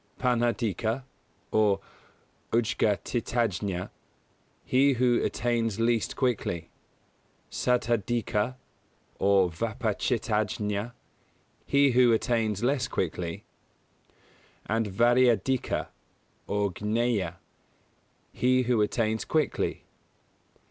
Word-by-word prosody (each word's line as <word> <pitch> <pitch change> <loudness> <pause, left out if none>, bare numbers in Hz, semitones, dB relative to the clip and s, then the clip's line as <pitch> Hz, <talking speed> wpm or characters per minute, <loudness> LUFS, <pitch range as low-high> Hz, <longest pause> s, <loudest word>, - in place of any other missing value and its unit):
Pannādhika, 120 -1 0 0.5
or 105 -2 +3 0.7
Udghatitajña 105 -3 0 0.7
"he 135 +2 +4
who 125 -1 +2
attains 115 -2 -1
least 115 -1 +1
quickly"; 115 - -1 0.8
Saddhādhika, 120 -1 0 0.6
or 95 -2 +3
Vipachitajña 110 +1 -1 0.7
"he 140 -1 +4
who 125 -1 +5
attains 110 -3 0
less 130 -1 +1
quickly"; 85 -1 -3 1.2
and 110 0 0
Viryādhika, 120 +3 +2 0.6
or 100 -1 0
Gneyya 105 -2 -1 1.0
"he 130 +1 +2
who 120 -3 +2
attains 110 +1 0
quickly". 155 -1 -1
115 Hz, 70 wpm, -28 LUFS, 105-120 Hz, 1.2 s, who